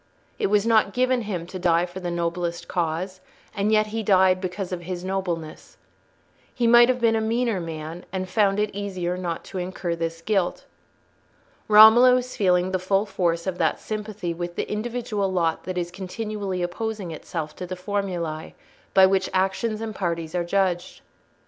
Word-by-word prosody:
It - - +2
was 205 +1 +2
not 220 -3 +3
given 255 0 +2
him 190 -6 -4
to 185 +2 -7
die 175 -1 +3
for 180 +1 -8
the 180 -1 -4
noblest 170 0 -2
cause, 180 +2 -2 0.3
and 205 +1 +1
yet 215 0 +4
he 225 - -1
died 190 -3 +4
because 185 0 -4
of 180 -1 -3
his 175 0 -5
nobleness. 180 -4 -4 0.7
He 245 - -1
might 240 +1 +7
have 255 -1 +1
been 230 -1 +3
a 220 - +1
meaner 230 -1 0
man 165 +1 -7
and 185 0 -3
found 200 0 +2
it 210 0 0
easier 185 -3 -3
not 175 -2 -4
to 190 - -6
incur 180 -1 -3
this 165 0 -4
guilt. 195 -4 0 1.0
Romola 220 +4 +8
was 255 0 -2
feeling 180 -2 +2
the 185 - 0
full 195 +3 +1
force 175 -4 -1
of 185 -2 -3
that 160 -2 +1
sympathy 210 -5 -4
with 175 +1 -5
the - - -2
individual 210 -3 -2
lot 170 -3 0
that 185 -1 -4
is 175 -1 -2
continually 195 0 -4
opposing 200 +1 -4
itself 155 -1 -5
to 180 - -6
the 185 - -4
formulae 180 -5 -3 0.4
by 190 -1 +8
which 190 0 +1
actions 195 +4 0
and 225 -1 -4
parties 170 -4 -3
are 175 -1 0
judged. 180 0 -1
185 Hz, 175 wpm, -24 LUFS, 175-210 Hz, 1.0 s, Romola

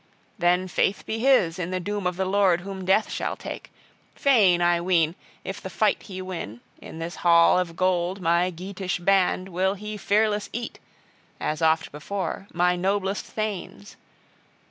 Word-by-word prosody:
Then 180 +1 +2
faith 190 +2 0
be 220 - -3
his 225 -10 +3
in 175 -1 -3
the 185 0 -2
doom 205 0 -2
of 180 - -2
the 190 - 0
Lord 190 -2 +3
whom 190 0 -7
death 195 +4 +3
shall - - -2
take. - - -8 0.5
Fain, 210 -11 +4
I 175 0 +2
ween, 170 -3 +2 0.3
if - - -6
the - - -6
fight - - +1
he 185 -2 -7
win, 165 - -6 0.2
in - - -10
this 165 +1 -5
hall 170 +1 +5
of 170 -2 -3
gold 185 +1 0
my 175 0 +2
Geatish 185 +2 -4
band 185 0 +2
will 190 +2 0
he 210 +1 -6
fearless 210 +1 +1
eat, 235 0 -5 0.6
as 155 +1 -2
oft 160 0 +2
before, 185 +5 -4
my 180 +1 +2
noblest 195 +2 -1
thanes. 200 - -5
185 Hz, 165 wpm, -25 LUFS, 175-200 Hz, 0.6 s, hall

